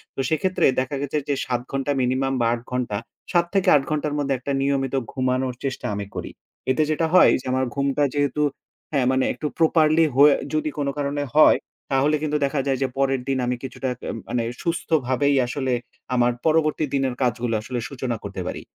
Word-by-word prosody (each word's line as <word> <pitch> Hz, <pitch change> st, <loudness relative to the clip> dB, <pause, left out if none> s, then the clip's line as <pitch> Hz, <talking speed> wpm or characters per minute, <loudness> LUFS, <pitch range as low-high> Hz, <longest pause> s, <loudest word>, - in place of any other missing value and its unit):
তো -, -, -8 dB
সেক্ষেত্রে 180 Hz, +4 st, +1 dB
দেখা 130 Hz, +2 st, -2 dB
গেছে 145 Hz, +1 st, -2 dB
যে -, -, +3 dB
৭ 125 Hz, -1 st, -1 dB
ঘন্টা 135 Hz, +1 st, -1 dB
minimum 130 Hz, +2 st, 0 dB
বা -, -, +3 dB
৮ 120 Hz, -, -4 dB
ঘন্টা, 125 Hz, -5 st, -1 dB, 0.3 s
৭ 175 Hz, -1 st, +3 dB
থেকে 195 Hz, -, +2 dB
৮ 140 Hz, -, +3 dB
ঘন্টার 150 Hz, -1 st, -1 dB
মধ্যে 140 Hz, -1 st, 0 dB
একটা 135 Hz, +3 st, -4 dB
নিয়মিত 135 Hz, -1 st, 0 dB, 0.2 s
ঘুমানোর 130 Hz, -1 st, 0 dB
চেষ্টা 135 Hz, -2 st, -3 dB
আমি 100 Hz, 0 st, -4 dB
করি। -, -, -5 dB, 0.4 s
এতে 155 Hz, +4 st, +2 dB
যেটা 160 Hz, +2 st, +1 dB
হয় 185 Hz, -, +7 dB
যে -, -, -18 dB
আমার 130 Hz, 0 st, +1 dB
ঘুমটা 140 Hz, +1 st, +1 dB
যেহেতু 145 Hz, 0 st, 0 dB, 0.5 s
হ্যাঁ, 140 Hz, -4 st, +1 dB
মানে 130 Hz, 0 st, +2 dB
একটু 140 Hz, +5 st, -4 dB
properly 160 Hz, 0 st, +4 dB
হয়ে 145 Hz, +2 st, +7 dB, 0.2 s
যদি 155 Hz, 0 st, 0 dB
কোন 145 Hz, -1 st, -1 dB
কারণে 145 Hz, 0 st, -1 dB
হয়। 155 Hz, -, +7 dB, 0.3 s
তাহলে 140 Hz, +3 st, +3 dB
কিন্তু 150 Hz, -1 st, 0 dB
দেখা 140 Hz, +1 st, -1 dB
যায় 135 Hz, -1 st, +1 dB
যে -, -, +1 dB
পরের 135 Hz, -1 st, +1 dB
দিন 135 Hz, -1 st, +1 dB
আমি 125 Hz, +1 st, 0 dB
কিছুটা 130 Hz, 0 st, -4 dB
কে -, -, -10 dB, 0.2 s
মানে 120 Hz, -1 st, 0 dB, 0.2 s
সুস্থভাবেই 145 Hz, -5 st, +1 dB
আসলে 130 Hz, +1 st, -2 dB, 0.4 s
আমার 120 Hz, 0 st, +3 dB
পরবর্তী 155 Hz, -1 st, +2 dB
দিনের 135 Hz, -2 st, +1 dB
কাজগুলো 120 Hz, -1 st, 0 dB
আসলে 120 Hz, +2 st, -4 dB
সূচনা 130 Hz, -3 st, -3 dB
করতে -, -, -5 dB
পারি। -, -, -4 dB
135 Hz, 190 wpm, -23 LUFS, 130-150 Hz, 0.5 s, হয়